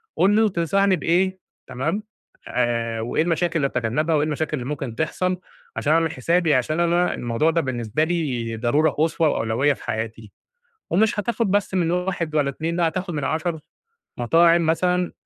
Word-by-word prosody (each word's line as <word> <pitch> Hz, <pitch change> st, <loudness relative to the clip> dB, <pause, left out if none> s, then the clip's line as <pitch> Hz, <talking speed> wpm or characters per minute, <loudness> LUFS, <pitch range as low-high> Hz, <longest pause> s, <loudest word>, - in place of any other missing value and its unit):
قُل 195 Hz, +3 st, +3 dB
له 220 Hz, 0 st, +4 dB
تنصحني 190 Hz, +2 st, +2 dB
بإيه 185 Hz, +3 st, +1 dB, 0.3 s
تمام، 160 Hz, +12 st, -2 dB, 0.4 s
آآ 115 Hz, -2 st, -1 dB
وإيه 120 Hz, +7 st, 0 dB
المشاكل 170 Hz, 0 st, 0 dB
اللي 140 Hz, -3 st, +1 dB
أتجنّبها 135 Hz, +7 st, 0 dB
وإيه 150 Hz, 0 st, +2 dB
المشاكل 155 Hz, 0 st, -2 dB
اللي 125 Hz, -, -5 dB
ممكن 135 Hz, -6 st, -4 dB
تحصل 180 Hz, +6 st, -1 dB, 0.4 s
عشان 155 Hz, -, +1 dB
أعمل 165 Hz, -1 st, +2 dB
حسابي، 165 Hz, +3 st, +1 dB
عشان 155 Hz, +6 st, 0 dB
أنا 175 Hz, +1 st, +2 dB
الموضوع 120 Hz, +7 st, 0 dB
ده 165 Hz, +1 st, +1 dB
بالنسبة 120 Hz, 0 st, -1 dB
لي 135 Hz, -9 st, -2 dB
ضرورة 145 Hz, +7 st, +2 dB
قصوى 160 Hz, +2 st, +1 dB
وأولوية 120 Hz, +4 st, +1 dB
في -, -, -13 dB
حياتي 110 Hz, -1 st, -4 dB, 0.6 s
ومش 210 Hz, +3 st, +2 dB
هتاخُد 230 Hz, 0 st, -1 dB
بس 200 Hz, -1 st, 0 dB
من 175 Hz, -3 st, +1 dB
1 180 Hz, -3 st, -2 dB
ولا 145 Hz, -2 st, +2 dB
2، 160 Hz, +4 st, -3 dB
لأ، 170 Hz, -2 st, +2 dB
هتاخُد 180 Hz, +1 st, -4 dB
من 145 Hz, -2 st, -2 dB
10، 160 Hz, 0 st, -2 dB, 0.6 s
مطاعم 165 Hz, +7 st, +4 dB
مثلًا 180 Hz, +2 st, +1 dB
160 Hz, 165 wpm, -22 LUFS, 130-175 Hz, 0.6 s, له